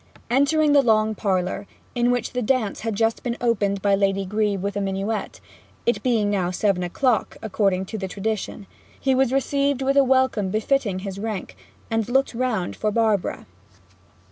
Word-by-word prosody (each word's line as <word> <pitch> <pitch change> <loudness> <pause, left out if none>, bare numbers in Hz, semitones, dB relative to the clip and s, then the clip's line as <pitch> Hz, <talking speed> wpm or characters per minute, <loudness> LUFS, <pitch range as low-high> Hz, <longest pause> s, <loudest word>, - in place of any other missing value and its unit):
Entering 290 +4 +3
the 285 -1 +6
long 220 -3 +3
parlour, 195 -1 -1 0.3
in 240 0 +1
which 245 -2 -1
the 250 - -1
dance 235 -3 0
had 225 -1 -3
just 225 +1 +1
been 240 -1 -3
opened 200 -5 0
by 200 -1 +3
Lady 195 0 +1
Grebe 210 0 0
with 200 0 -2
a 205 - -1
minuet 195 +3 -3 0.5
it 235 - +1
being 225 -5 +1
now 185 -3 0
seven 185 0 0
o'clock, 220 +6 0
according 195 -3 0
to 220 +3 -6
the 190 - -3
tradition 205 +1 -4 0.3
he 270 - +2
was 260 -1 +2
received 275 0 +1
with 275 +1 +1
a 280 - +6
welcome 260 -6 +2
befitting 215 -1 0
his 195 0 -5
rank, 215 -3 -4 0.4
and 225 0 0
looked 270 +1 +2
round 230 -7 -1
for 215 - -1
Barbara. 215 -3 0
220 Hz, 170 wpm, -23 LUFS, 200-250 Hz, 0.5 s, the